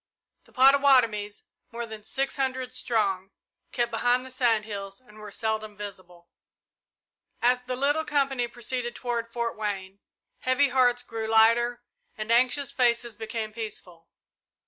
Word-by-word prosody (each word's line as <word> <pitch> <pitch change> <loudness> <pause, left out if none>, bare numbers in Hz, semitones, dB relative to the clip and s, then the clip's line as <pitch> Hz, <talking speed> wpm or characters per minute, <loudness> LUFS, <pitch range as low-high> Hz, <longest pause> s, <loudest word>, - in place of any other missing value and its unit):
The - - -21
Pottawattomies, 255 -6 +4 0.3
more 235 0 -4
than 220 -1 -9
six 270 +6 -2
hundred 260 -2 -2
strong, 200 -7 0 0.4
kept 240 -1 0
behind 245 +2 +1
the 260 - -10
sand 235 -4 +2
hills 200 -2 -6
and 215 -4 -18
were 210 -1 -9
seldom 215 0 -3
visible. 185 -4 -10 1.1
As 250 +1 +3
the 255 0 -3
little 290 +4 +1
company 275 -5 0
proceeded 240 +1 -4
toward 235 -2 -3
Fort 235 -1 -2
Wayne, 200 -2 -4 0.4
heavy 260 +2 +2
hearts 245 -1 +3
grew 225 -2 -5
lighter 230 +2 +4 0.3
and 215 +1 -3
anxious 255 +3 +3
faces 235 -2 +1
became 220 0 -5
peaceful. 210 -7 -8
235 Hz, 135 wpm, -27 LUFS, 215-255 Hz, 1.1 s, Pottawattomies